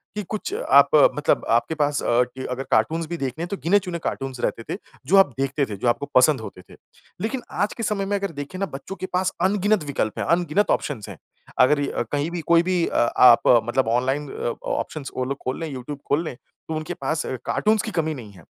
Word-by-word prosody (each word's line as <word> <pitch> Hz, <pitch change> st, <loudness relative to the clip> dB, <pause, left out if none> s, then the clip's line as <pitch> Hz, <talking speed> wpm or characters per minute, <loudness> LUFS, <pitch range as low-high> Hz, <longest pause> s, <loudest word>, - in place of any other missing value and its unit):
कि 210 Hz, -, -3 dB
कुछ 215 Hz, -, -4 dB
आप -, -, +5 dB, 0.3 s
मतलब -, -, +1 dB
आपके 160 Hz, -, +2 dB
पास 145 Hz, -1 st, 0 dB
अ, 120 Hz, +1 st, +3 dB
कि 130 Hz, +1 st, -8 dB
अगर 130 Hz, +1 st, -3 dB
कार्टून्स 160 Hz, +10 st, +2 dB
भी 170 Hz, +1 st, -4 dB
देखने 140 Hz, +2 st, -3 dB
हैं -, -, -3 dB
तो 200 Hz, -, -3 dB
गिने 200 Hz, +5 st, +4 dB
चुने 180 Hz, -3 st, -5 dB
कार्टून्स 135 Hz, -4 st, -4 dB
रहते 115 Hz, -, -1 dB
थे -, -, -4 dB, 0.3 s
जो 185 Hz, -, +4 dB
आप 195 Hz, -, +7 dB
देखते 135 Hz, +1 st, 0 dB
थे, 105 Hz, -, -6 dB
जो 120 Hz, -, -2 dB
आपको 120 Hz, +4 st, +1 dB
पसंद 130 Hz, 0 st, +5 dB
होते 95 Hz, -, -9 dB
थे। -, -, -13 dB, 0.5 s
लेकिन 245 Hz, +4 st, -2 dB
आज 205 Hz, -, -1 dB
के 230 Hz, -, -6 dB
समय 205 Hz, -2 st, -1 dB
में 200 Hz, +1 st, 0 dB
अगर 200 Hz, -2 st, -3 dB
देखें 145 Hz, +6 st, -8 dB
ना 195 Hz, -, +1 dB
बच्चों 140 Hz, +8 st, -7 dB
के 185 Hz, -1 st, -5 dB
पास 185 Hz, +1 st, +1 dB
अनगिनत 200 Hz, +1 st, +2 dB
विकल्प 130 Hz, -6 st, -2 dB
हैं, -, -, -1 dB
अनगिनत 175 Hz, +3 st, +2 dB
ऑप्शंस 120 Hz, -9 st, -6 dB
हैं। -, -, -9 dB, 0.4 s
अगर 145 Hz, +3 st, +5 dB
अ, -, -, -1 dB
कहीं 145 Hz, +2 st, 0 dB
भी 175 Hz, -1 st, -3 dB
कोई 170 Hz, 0 st, +6 dB
भी 180 Hz, -1 st, +1 dB
अ, -, -, -5 dB, 0.2 s
आप 125 Hz, -2 st, +7 dB, 0.2 s
मतलब 120 Hz, 0 st, +1 dB
ऑनलाइन 135 Hz, +3 st, -1 dB
अ, 120 Hz, -, -3 dB, 0.2 s
ऑप्शंस 150 Hz, -4 st, -4 dB
वो 130 Hz, -, 0 dB
लोग 140 Hz, +1 st, -3 dB
खोल 130 Hz, -, -2 dB
लें, 165 Hz, -, -3 dB
यूट्यूब 135 Hz, +3 st, -6 dB
खोल 145 Hz, +4 st, +2 dB
लें, 140 Hz, -, -5 dB
तो 160 Hz, +5 st, -10 dB
उनके 155 Hz, +2 st, -4 dB
पास 155 Hz, -1 st, 0 dB
कार्टून्स 215 Hz, -, 0 dB
की 220 Hz, -, -5 dB
कमी 160 Hz, -4 st, -1 dB
नहीं 115 Hz, -6 st, -10 dB
है। 90 Hz, -4 st, -16 dB
155 Hz, 235 wpm, -23 LUFS, 130-185 Hz, 0.5 s, आप